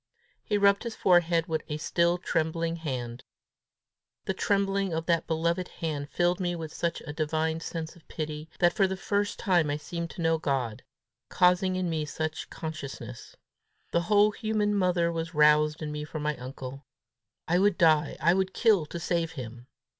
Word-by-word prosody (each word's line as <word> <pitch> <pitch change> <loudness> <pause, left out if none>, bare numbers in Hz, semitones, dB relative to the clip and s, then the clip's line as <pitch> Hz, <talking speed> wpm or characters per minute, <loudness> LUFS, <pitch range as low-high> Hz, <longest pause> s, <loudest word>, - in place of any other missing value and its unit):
He 210 - 0
rubbed 200 0 +4
his 235 -2 -5
forehead 175 -2 +3
with 160 -3 -1
a 150 - -2
still 170 +3 +1
trembling 165 0 -1
hand. 125 -6 -5 1.0
The - - 0
trembling 195 -2 0
of 165 0 -2
that 170 -1 +1
beloved 170 +2 0
hand 145 -3 -4
filled 175 +1 +1
me 175 -2 -1
with 160 -2 -6
such 170 -1 -2
a 145 - -7
divine 160 +1 -1
sense 165 -1 -5
of 170 - -20
pity, 155 0 -5
that 175 -1 +4
for 195 - +3
the 190 0 -3
first 205 +1 -1
time 175 -7 +2
I 145 - 0
seemed 170 +2 -5
to 170 - -8
know 165 0 +2
God, 130 -7 -1 0.5
causing 180 +1 +3
in 185 -1 -1
me 160 -2 -1
that 155 0 -3
consciousness! 155 -4 -7 0.6
The 170 - +2
whole 210 0 +5
human 215 -1 0
mother 180 -3 +2
was 165 0 -4
roused 150 +1 +4
in 150 - -3
me 150 0 -4
for 155 +1 -6
my 150 0 -1
uncle. 130 +2 -8 0.6
I 175 +2 +3
would 200 -1 +3
die, 155 -3 +3
I 170 +2 +4
would 190 0 0
kill 205 -10 +3
to 170 - -6
save 170 -1 -1
him! 125 -3 -8
165 Hz, 175 wpm, -28 LUFS, 150-180 Hz, 1.0 s, whole